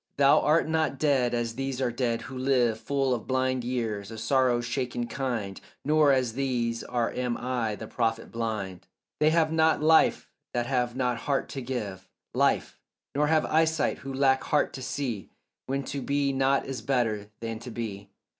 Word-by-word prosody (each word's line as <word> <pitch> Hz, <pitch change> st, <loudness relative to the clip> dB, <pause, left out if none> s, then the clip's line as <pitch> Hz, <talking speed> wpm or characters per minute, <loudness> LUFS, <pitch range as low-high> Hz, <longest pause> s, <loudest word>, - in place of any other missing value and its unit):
Thou 140 Hz, 0 st, +6 dB
art 155 Hz, +2 st, +3 dB
not 160 Hz, -3 st, 0 dB
dead 130 Hz, -5 st, +2 dB
as 120 Hz, -1 st, -1 dB
these 135 Hz, +1 st, -3 dB
are 130 Hz, -2 st, +1 dB
dead 120 Hz, -1 st, -1 dB
who 130 Hz, -, -8 dB
live 125 Hz, -4 st, +2 dB
Full 135 Hz, -1 st, 0 dB
of 115 Hz, -3 st, -4 dB
blind 130 Hz, -1 st, 0 dB
years, 115 Hz, -5 st, -2 dB
a 115 Hz, -, -8 dB
sorrow 125 Hz, +2 st, +2 dB
shaken 120 Hz, 0 st, -2 dB
kind, 120 Hz, -6 st, -3 dB, 0.2 s
Nor 150 Hz, -1 st, +5 dB
as 130 Hz, -4 st, +1 dB
these 120 Hz, -3 st, -1 dB
are 120 Hz, -2 st, -1 dB
am 125 Hz, -1 st, -2 dB
I 120 Hz, -4 st, -1 dB
the -, -, -7 dB
prophet 115 Hz, -1 st, -1 dB
blind; 105 Hz, -6 st, -4 dB, 0.3 s
They 150 Hz, -, +5 dB
have 160 Hz, -1 st, +3 dB
not 160 Hz, 0 st, +3 dB
life 160 Hz, +1 st, +4 dB, 0.2 s
that 120 Hz, 0 st, +1 dB
have 125 Hz, -1 st, 0 dB
not 125 Hz, -2 st, 0 dB
heart 140 Hz, +4 st, -1 dB
to 135 Hz, -, -5 dB
give 105 Hz, -7 st, -5 dB, 0.2 s
Life, -, -, +1 dB, 0.3 s
nor 150 Hz, +2 st, +2 dB
have 155 Hz, 0 st, +3 dB
eyesight 160 Hz, 0 st, +2 dB
who 135 Hz, -, -7 dB
lack 135 Hz, 0 st, +2 dB
heart 150 Hz, -, +1 dB
to 135 Hz, -, -7 dB
see 125 Hz, -6 st, -3 dB, 0.4 s
When 135 Hz, +1 st, -1 dB
to 140 Hz, +1 st, -4 dB
be 140 Hz, 0 st, 0 dB
not 135 Hz, +1 st, +2 dB
is 135 Hz, -4 st, -5 dB
better 110 Hz, -5 st, 0 dB
than 115 Hz, -1 st, -4 dB
to 125 Hz, -, -8 dB
be. 105 Hz, -4 st, -6 dB
125 Hz, 180 wpm, -27 LUFS, 115-140 Hz, 0.4 s, Thou